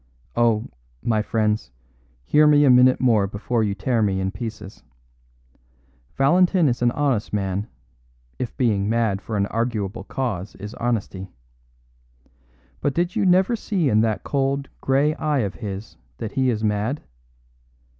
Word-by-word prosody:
Oh, 115 -2 +2 0.4
my 110 -2 +1
friends, 105 - -1 0.6
hear 150 - +5
me 145 -1 +5
a 135 - +6
minute 125 +1 +5
more 110 -6 +3
before 110 +4 -2
you 100 -2 -1
tear 115 +3 0
me 100 -3 +1
in 95 0 -1
pieces. 110 -2 -7 1.4
Valentin 175 +4 +4
is 120 -2 -1
an 120 - +4
honest 135 -7 0
man, 100 +1 -1 0.7
if 125 - -4
being 105 -5 +1
mad 110 -4 0
for 110 0 -4
an 100 - +2
arguable 115 -2 -2
cause 105 -7 -4
is 105 +3 -8
honesty. 105 -6 -3 1.5
But 145 - -1
did 175 +1 0
you 195 - +2
never 190 +6 +4
see 190 -9 -1
in 110 -1 +3
that 110 -2 0
cold, 140 0 -1
grey 140 +3 +2
eye 150 -3 0
of 100 -3 -2
his 100 -1 -7 0.2
that 110 - -5
he 130 -1 +1
is 110 -2 -1
mad! 105 +7 -1
115 Hz, 145 wpm, -23 LUFS, 105-135 Hz, 1.5 s, a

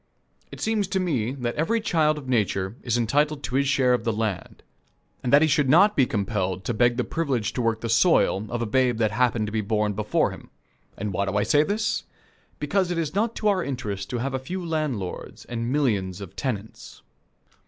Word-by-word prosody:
It - - -9
seems 215 -3 0
to 190 0 -1
me 130 - -1
that 120 -3 -3
every 195 +10 0
child 155 -8 +1
of 140 -3 -8
Nature 100 -4 0
is 120 -1 0
entitled 145 +5 +1
to - - -5
his 140 +1 +2
share 135 -3 +3
of 125 - 0
the 115 - +1
land, 110 -4 -4 0.6
and 125 - -2
that 145 +2 +7
he - - +4
should 150 -3 +2
not 195 +8 +6
be 130 -3 +4
compelled 95 -3 -2
to 120 - -2
beg 120 +2 +2
the 125 - +1
privilege 135 -10 -1
to 125 - -2
work 115 -1 0
the 115 - -3
soil, 115 - +3
of 120 0 -2
a - - -1
babe 125 +1 +2
that 110 -2 +1
happened 120 -1 +1
to 105 - -5
be 110 0 0
born 105 0 0
before 105 +1 0
him. - - -11 0.5
And 100 0 -3
why 100 +2 0
do 100 +1 -1
I 105 - +2
say 145 - +4
this? 205 +7 -1 0.5
Because 180 +5 0
it 175 - -2
is 160 -3 -2
not 220 +4 0
to 215 - -1
our 195 -3 +2
interest 105 -8 -4
to 125 - -2
have 135 +3 -2
a 130 - -1
few 175 +7 -5
landlords 150 - -4
and 115 0 -3
millions 105 -10 0
of 100 -4 -9
tenants. 110 -6 -5
125 Hz, 215 wpm, -25 LUFS, 110-150 Hz, 0.6 s, that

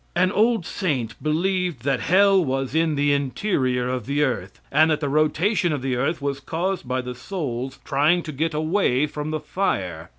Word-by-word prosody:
An 180 +1 +3
old 220 -3 +2
saint 135 - -2
believed 175 -2 0
that 135 -2 +1
hell 195 +1 +4
was 135 -2 -2
in 160 -1 +2
the 145 0 +2
interior 130 -3 0
of 125 -3 -3
the 145 +2 +1
earth, 110 -9 -3
and 155 +3 +5
that 155 -1 +1
the 145 - -2
rotation 160 +6 +1
of 145 -4 -2
the 130 -2 0
earth 140 +5 -1
was 140 -1 -2
caused 170 +4 -3
by 130 +1 -1
the 125 0 -6
souls 130 -3 -5
trying 155 +6 +2
to 155 - -6
get 155 +3 -2
away 155 -4 +2
from 150 0 -5
the 155 0 -2
fire. 90 - -2
150 Hz, 190 wpm, -23 LUFS, 130-175 Hz, -, and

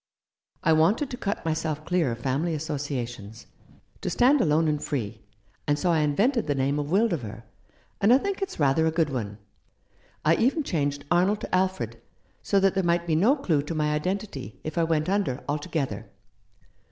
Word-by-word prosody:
I 160 - +4
wanted 190 - +2
to - - -3
cut 205 -6 -3
myself 155 -1 -2
clear 175 -7 +1
of 115 - -4
family 145 +6 0
associations 130 -8 -5 0.3
— - - -30
to - - -2
stand 265 +3 +4
alone 160 -1 +3
and 150 -1 0
free— 110 -6 -3 0.5
and 145 0 +2
so 175 +4 +1
I 165 - +3
invented 205 - +1
the 145 - +1
name 140 +2 0
of 145 - -2
Wildover; 155 - 0 0.6
and 205 +3 +5
I 250 - +8
think 400 +7 -3
it's 390 - -4
rather 150 +3 +3
a - - +2
good 160 -2 +1
one. 105 -6 -4 0.9
I 165 +2 +4
even 275 +6 +2
changed 145 - -2
Arnold 185 +4 +3
to - - -7
Alfred, 155 - -1 0.4
so 200 - +2
that 195 -1 +4
there 195 - +1
might 170 0 +1
be 165 -2 +1
no 215 - +4
clue 170 - +1
to 150 +3 -5
my 150 -1 +1
identity 150 - -3
if 155 - -5
I 170 - +2
went 155 -1 0
under 190 -10 0
altogether." 145 -6 -3
155 Hz, 185 wpm, -26 LUFS, 140-190 Hz, 0.9 s, I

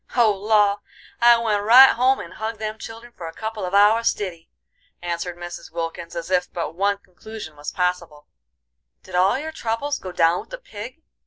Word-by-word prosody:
"Oh, 235 -4 +5
law! 205 0 +2 0.4
I 235 0 +7
went 220 -3 0
right 250 +6 +8
home 260 +2 +2
and - - -8
hugged 220 +1 -4
them 215 0 -5
children 230 +1 -10
for 170 - -7
a 165 - -8
couple 220 0 -5
of 180 +2 -2
hours 215 +3 +5
stiddy," 175 -5 -3 0.5
answered 175 0 -4
Mrs; 175 0 -8
Wilkins, 165 0 -5
as 170 +1 -5
if 180 -1 +1
but 170 -2 -4
one 200 +3 +1
conclusion 185 -2 -11
was 145 0 -6
possible. 175 -5 -2 0.8
"Did 185 - -14
all 185 +6 +3
your 310 +3 -5
troubles 285 0 -2
go 185 - -7
down 165 0 +3
with - - -11
the - - -6
pig?" 255 - -10
205 Hz, 185 wpm, -22 LUFS, 175-230 Hz, 0.8 s, right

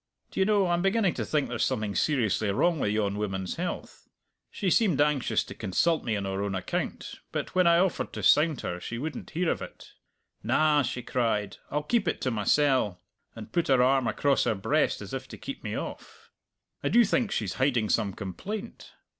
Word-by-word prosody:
D'ye 190 - +1
know, 205 -2 +3
I'm 175 -1 +1
beginning 195 -1 +2
to - - -3
think 150 -3 0
there's 120 -1 -1
something 105 -2 -1
seriously 110 -7 +1
wrong 165 - +2
with 105 - 0
yon 105 -1 0
woman's 95 -3 -3
health! 175 +1 -5 0.4
She 190 -4 -1
seemed 195 - +3
anxious 145 -3 +2
to - - -9
consult 155 - 0
me 110 - -1
on 100 -1 -2
her 95 0 -2
own 100 -1 -2
account, 90 - -4
but - - -4
when 185 -1 +4
I 170 0 +6
offered 185 0 0
to - - -5
sound 155 -2 +4
her 90 - -4
she 115 +6 -5
wouldn't 155 +6 -5
hear 170 +1 0
of - - -3
it. - - -10 0.5
'Na,' 155 -1 +3
she 125 -1 -3
cried, 105 -5 -1
'I'll 150 +1 -1
keep 220 +3 +1
it - - 0
to 130 - 0
mysell!' 115 -3 +2 0.4
and - - -9
put 170 -1 0
her 130 -2 +4
arm 130 -1 +3
across 140 +5 +2
her 110 - +1
breast 100 +3 0
as - - -9
if - - -4
to - - -10
keep - - -7
me - - -3
off. - - -8 0.5
I - - +1
do 240 0 +5
think 230 +2 +1
she's 105 - -2
hiding 125 -5 +2
some 105 -2 +1
complaint! 195 - -7
135 Hz, 200 wpm, -28 LUFS, 105-170 Hz, 0.5 s, I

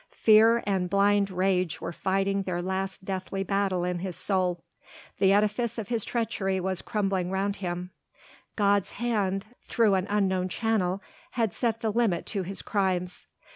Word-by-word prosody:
Fear 225 +2 +6
and 190 -3 0
blind 200 0 +3
rage 185 -2 0
were - - -4
fighting 195 +2 0
their 185 -2 -3
last 190 +1 -3
deathly 195 0 -3
battle 195 -2 0
in 180 0 -1
his 185 -1 -4
soul. 180 -3 0 0.6
The 195 -1 +5
edifice 210 +3 +1
of 215 -3 -5
his 230 -3 0
treachery 195 -5 -1
was 185 -1 -2
crumbling 195 -4 -1
around 195 +1 -1
him; 180 -1 -4 0.6
God's 200 -2 +2
hand 205 -4 -1 0.2
through 225 -4 +2
an 190 0 +1
unknown 190 -3 +1
channel 200 -2 0 0.3
had 225 -5 0
set 230 -2 -1
the 220 - 0
limit 210 -6 +1
to 200 - 0
his 190 +2 -5
crimes. 185 -3 -1
195 Hz, 155 wpm, -27 LUFS, 185-210 Hz, 0.6 s, Fear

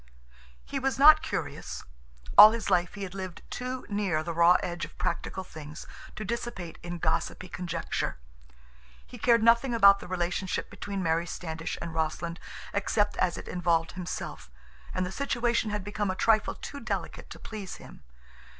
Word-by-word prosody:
He 275 - -3
was 270 0 0
not 300 +3 +9
curious. - - -4 0.5
All 215 +1 +11
his 230 -1 -3
life 175 +2 +2
he 200 - -5
had 185 -1 -6
lived 185 -2 -6
too 255 +1 -4
near 200 -7 0
the 170 +1 -4
raw 170 +2 +6
edge 175 -1 -3
of - - -7
practical 185 +1 -2
things 155 -4 -9 0.3
to 215 - -5
dissipate 235 -6 -5
in 175 0 -5
gossipy 170 +2 -1
conjecture. 175 -2 -3 0.9
He - - -12
cared 235 -2 +4
nothing 235 +2 +4
about 200 -3 +7
the - - -9
relationship 180 +1 -2
between 200 -2 -4
Mary 165 +1 +1
Standish 160 -1 -5
and 170 -1 -5
Rossland 165 +1 -2 0.3
except 205 +1 +1
as 180 -2 +1
it - - -8
involved 170 -2 +1
himself, 180 - -6 0.4
and 185 - -1
the 180 - -5
situation 240 -2 0
had 210 -1 -2
become 205 0 -2
a 185 - -1
trifle 215 +1 +2
too 285 - -7
delicate - - -4
to - - -9
please 205 -4 -7
him. - - -13
185 Hz, 165 wpm, -28 LUFS, 170-215 Hz, 0.9 s, All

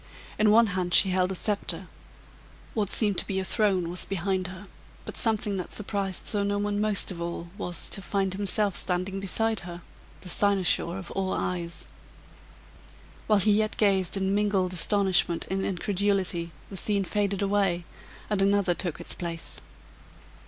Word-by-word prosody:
In 215 0 +4
one 230 +2 +6
hand 180 -2 +1
she 190 - +6
held 185 0 +1
a - - -3
sceptre; 190 -3 -1 0.9
what 210 -4 -1
seemed 205 -4 +3
to - - -3
be 195 - -2
a 190 - 0
throne 190 -3 +1
was 180 - -2
behind 190 0 -2
her, 185 +2 -10 0.4
but - - -7
something 215 -3 0
that 180 - -5
surprised 200 -3 -1
Sir 205 -2 +1
Norton 205 0 -1
most 210 -2 0
of 170 -2 -7
all 170 0 -5
was, 175 -3 -2
to 195 - -2
find 195 -1 -1
himself 200 0 +4
standing 185 +2 -1
beside 220 +3 0
her, 175 -1 -9 0.4
the - - -9
cynosure 190 -2 +2
of 190 -2 -8
all 190 -1 -2
eyes. 170 -2 -3 1.4
While 215 - +4
he 200 +2 +5
yet 215 +1 +1
gazed 195 -3 +2
in 190 0 0
mingled 200 -3 +1
astonishment 185 -2 +3
and 190 0 -1
incredulity, 190 -3 -1 0.2
the 195 - -6
scene 200 +1 +2
faded 200 +1 -1
away, 195 -4 0 0.4
and 205 -2 0
another 200 -2 +3
took 175 -2 -3
its - - -4
place. 170 -2 -5
195 Hz, 160 wpm, -27 LUFS, 180-205 Hz, 1.4 s, one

